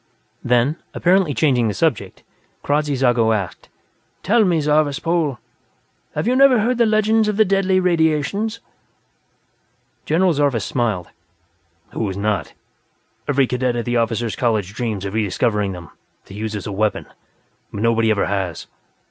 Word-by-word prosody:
Then, 125 +6 +2 0.2
apparently 180 -2 +2
changing 125 -7 +2
the 105 - -2
subject, 160 -9 -1 0.4
Kradzy 145 0 0
Zago 120 -4 +2
asked: 95 -5 -6 0.5
"Tell 225 +4 +3
me, 175 -3 +2
Zarvas 150 -1 +1
Pol; 165 -6 -1 0.8
have - - -2
you 250 - +2
never 265 -2 +5
heard 240 +3 0
the 235 - +4
legends 215 0 +2
of 210 -1 -1
the 220 - +5
Deadly 195 -1 +2
Radiations?" 175 +5 0 1.5
General 175 +3 +2
Zarvas 140 -7 0
smiled. 110 -8 -2 0.8
"Who 110 - -2
has 95 0 -5
not? 100 -6 -2 0.7
Every 140 -1 +2
cadet 125 0 -1
at 120 - -3
the 120 0 0
Officers' 115 -1 -1
College 110 -6 -1
dreams 110 -4 -3
of 100 - -5
re 110 0 +1
discovering 105 0 -1
them, 85 -3 -10 0.3
to - - -13
use 110 +1 -4
as 100 - -5
a - - -4
weapon, 105 +2 -1 0.7
but 100 - -4
nobody 115 -1 +2
ever 105 -2 +1
has. 95 -5 -3
125 Hz, 150 wpm, -20 LUFS, 110-170 Hz, 1.5 s, never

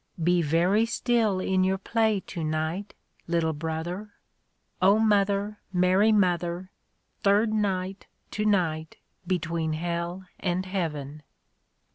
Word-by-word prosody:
*' 165 - -5
Be 180 -1 +3
very 175 +8 +2
still 230 -4 +1
in 185 0 +1
your 190 +1 +1
play 220 0 +1
to 170 -3 -6
night, 160 +6 -2 0.3
Little 165 -1 +1
brother." 165 +6 -4 0.7
(0 200 +3 +6
Mother, 205 -1 +2
Mary 185 +4 +4
Mother, 180 -2 +1 0.5
Third 210 +2 +3
night, 195 -2 -1 0.2
to 210 - -2
night, 165 -7 0 0.3
between 165 -3 -1
Hell 170 +3 -3
and 185 0 -1
Heaven!) 155 -6 -3
185 Hz, 115 wpm, -27 LUFS, 170-205 Hz, 0.7 s, 0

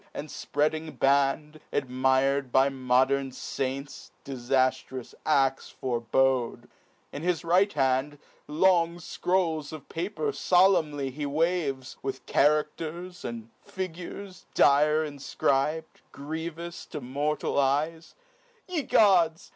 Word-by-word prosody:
And 150 - -6
fpreading 155 0 -2
band, 140 +3 +1
admir'd 130 0 +1
by 135 +2 +4
modern 130 +1 +1
faints, 135 +2 -5 0.2
Difaftrous 130 -1 -1
als 135 -3 +2
forebode, 125 0 0 0.4
in 145 - -6
his 175 0 0
right 185 +4 +3
hand 135 0 0 0.3
Long 170 +2 +3
fcrolls 170 -3 -1
of 155 -2 -9
paper 205 - -2
folemnly 165 - +2
he 145 +2 -4
waves, 145 -4 -1
With 135 -1 -5
characters, 155 +4 0
and 115 -1 -6
figures, 185 +1 -7
dire 150 +2 +4
infcrib'd, 145 +2 -1
Grievous 160 +3 -6
to - - -6
mortal 140 +3 -1
eyes; 150 +4 0 0.5
(ye 355 -4 -1
gods 180 - +3
150 Hz, 100 wpm, -27 LUFS, 135-165 Hz, 0.5 s, by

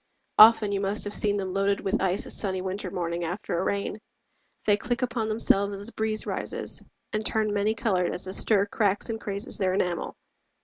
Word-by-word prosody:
Often 215 -1 +8
you 200 - -1
must 200 +1 0
have 205 - -2
seen 205 -1 +4
them 190 -2 -4
Loaded 195 +1 0
with 195 - -1
ice 190 +1 0
a - - -6
sunny 190 -3 -1
winter 190 +1 -4
morning 170 -1 -3
After 175 0 -3
a - - -1
rain. 200 +2 -2 0.7
They 205 - +4
click 240 +4 -3
upon 235 -3 -2
themselves 200 -2 +2
As 200 +1 -6
the 235 - -4
breeze 220 0 -1
rises, - - -3 0.3
and 215 0 -1
turn 215 -1 0
many 205 +2 0
colored 190 -6 0
As 180 - -3
the 190 - -4
stir 200 0 +4
cracks 205 0 0
and 225 -1 -5
crazes 200 +1 -1
their 185 -1 +1
enamel. 180 -3 -2
200 Hz, 205 wpm, -26 LUFS, 190-215 Hz, 0.7 s, Often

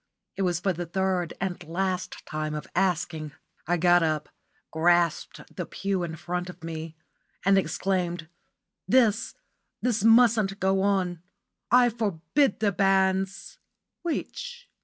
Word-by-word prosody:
It - - -3
was 175 -3 +1
for 190 +1 0
the 175 0 -5
third 185 -1 -1
and 180 -2 -3
last 185 +2 -3
time 155 0 -3
of 150 - -5
asking. 165 -5 -1 0.3
I 175 +1 +2
got 175 +1 +5
up, 155 -2 -1 0.4
grasped 170 0 +2
the - - -4
pew 195 -1 -2
in 165 -2 -4
front 180 +2 -4
of 180 - -11
me, 160 -1 -6 0.5
and 195 0 +5
exclaimed: 180 -3 -1 0.6
"This 230 -3 +3 0.4
this 230 -4 0
mustn't 225 -3 +5
go 190 0 +2
on. 185 -4 0 0.5
I 245 0 +6
forbid 215 - 0
the 210 -2 +3
banns!" 195 - +1 0.4
"Which?" 485 +8 -5
185 Hz, 130 wpm, -26 LUFS, 170-200 Hz, 0.6 s, I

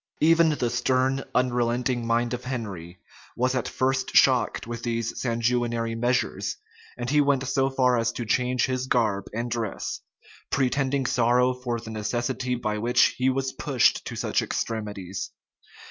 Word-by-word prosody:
Even 165 +1 +5
the 125 -6 -1
stern, 130 +2 +1
unrelenting 120 -1 +1
mind 120 +1 +1
of 125 +1 -5
Henry 100 -9 -5 0.4
was 125 +2 +1
at 130 -3 -1
first 130 0 -1
shocked - - +4
with 115 0 -6
these 115 -1 -2
sanguinary 115 -1 0
measures; 120 +2 -1 0.4
and 120 0 -4
he 150 0 +5
went 140 -2 +2
so 135 0 +1
far 125 -2 +2
as 115 0 +1
to 120 - -4
change 125 +2 +1
his 130 -1 -2
garb 105 -6 +1
and 120 +2 -3
dress; 115 -3 -3 0.5
pretending 135 0 +1
sorrow 125 +1 +3
for 125 -2 -3
the 110 0 -9
necessity 120 +4 -2
by 105 -3 -2
which 120 +3 +3
he 130 +1 +3
was 130 0 -1
pushed 135 -2 +2
to - - -5
such - - 0
extremities. 105 -4 -4
125 Hz, 150 wpm, -25 LUFS, 115-130 Hz, 0.5 s, Even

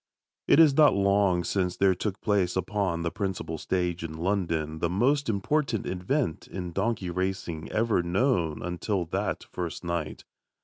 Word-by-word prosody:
It - - +6
is 155 -4 +7
not 150 -6 +6
long 100 -2 +3
since 90 0 -1
there 95 -1 +4
took 95 +2 -3
place 100 -4 +1
upon 95 -2 -1
the 85 - -1
principal 95 -5 -3
stage 90 -2 -1
in 80 -1 -5
London 85 -4 -1
the 85 - 0
most 130 - +1
important 115 +3 0
event 95 - -2
in 90 -2 -5
donkey 100 -1 -1
racing 90 -3 -3
ever 110 -4 +2
known 85 - 0
until 90 +2 -2
that 80 - -2
first 85 -3 -5
night. 85 -3 -3
95 Hz, 150 wpm, -27 LUFS, 85-105 Hz, -, is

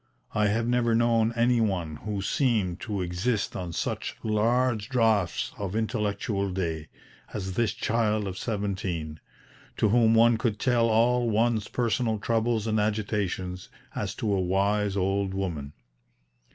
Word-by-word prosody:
I 105 0 +2
have 115 +3 0
never 120 -1 +2
known 115 -1 +3
any 120 0 +3
one 90 -8 -1
who 105 0 -4
seemed 105 - +1
to 105 -4 -3
exist 95 +6 -1
on 90 -2 -4
such - - -3
"large 110 +1 +1
draughts 110 -8 +1
of 100 -1 -3
intellectual 105 -2 -1
day" 80 -4 -3 0.5
as 95 -2 -3
this 115 +1 +1
child 110 -2 0
of 95 - -4
seventeen, 95 -8 -3 0.6
to 110 - +3
whom 115 0 +4
one 115 0 +5
could 115 -3 0
tell 120 -3 +2
all 120 +2 +3
one's 110 -1 +1
personal 115 -1 0
troubles 115 0 0
and 110 -1 +1
agitations, 100 -4 -2 0.2
as - - -3
to 105 -2 -1
a 95 - +1
wise 100 +2 +1
old 95 0 0
woman. 80 -8 -3
105 Hz, 140 wpm, -27 LUFS, 95-115 Hz, 0.6 s, one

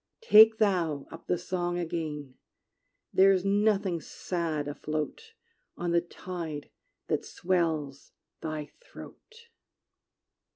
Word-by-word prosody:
Take 220 - +8
thou 175 -9 +1
up 165 - -11
the 180 - +1
song 175 0 -2
again: 155 -5 -4 0.8
There 195 +1 +6
is 190 -1 +1
nothing 200 -3 +2
sad 160 -5 -3
afloat 150 0 -4 0.4
On 175 0 -2
the 170 0 +3
tide 170 -4 -7 0.4
that - - 0
swells 160 -6 -1 0.3
thy 155 -2 -5
throat! 465 -1 -14
175 Hz, 100 wpm, -29 LUFS, 155-190 Hz, 0.8 s, Take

